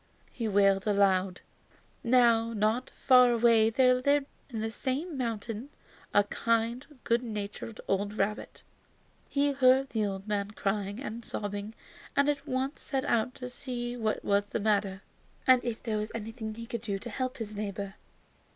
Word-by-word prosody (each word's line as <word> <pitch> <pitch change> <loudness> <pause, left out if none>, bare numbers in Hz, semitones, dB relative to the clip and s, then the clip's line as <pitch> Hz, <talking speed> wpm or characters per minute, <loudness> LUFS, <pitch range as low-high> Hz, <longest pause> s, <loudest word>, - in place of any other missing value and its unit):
he 230 -3 -3
wailed 195 -1 +3
aloud. 195 -3 +2 0.6
Now, 230 -2 +4
not 220 +4 0
far 250 -2 +5
away 230 -1 +5
there 255 +2 +4
lived 280 +3 +2 0.2
in 230 -4 -4
the 220 +1 -2
same 285 +8 -3
mountain 230 0 -3 0.4
a 205 - +5
kind, 230 +4 0 0.2
good 235 +1 +2
natured 215 -1 -6
old 200 +1 0
rabbit. 210 +2 -2 0.7
He 285 0 +2
heard 265 0 +4
the 215 -2 0
old 195 +1 -5
man 205 -1 -1
crying 200 +1 -1
and 235 -3 -6
sobbing 205 0 -5 0.4
and 280 0 +3
at 290 0 -2
once 265 +2 -2
set 270 0 -2
out 235 -1 +1
to 250 - -6
see 245 -1 -5
what 220 -3 -2
was 200 0 +2
the 205 - -3
matter, 200 -2 0 0.4
and 255 -2 +6
if 235 -2 -4
there 220 -3 -1
was 210 +1 -4
anything 220 0 -5
he 230 +1 -7
could 230 -1 -5
do 205 -4 -2
to 235 +5 -8
help 255 +3 -3
his 215 -3 -5
neighbor. 200 -1 -4
225 Hz, 160 wpm, -29 LUFS, 205-255 Hz, 0.7 s, and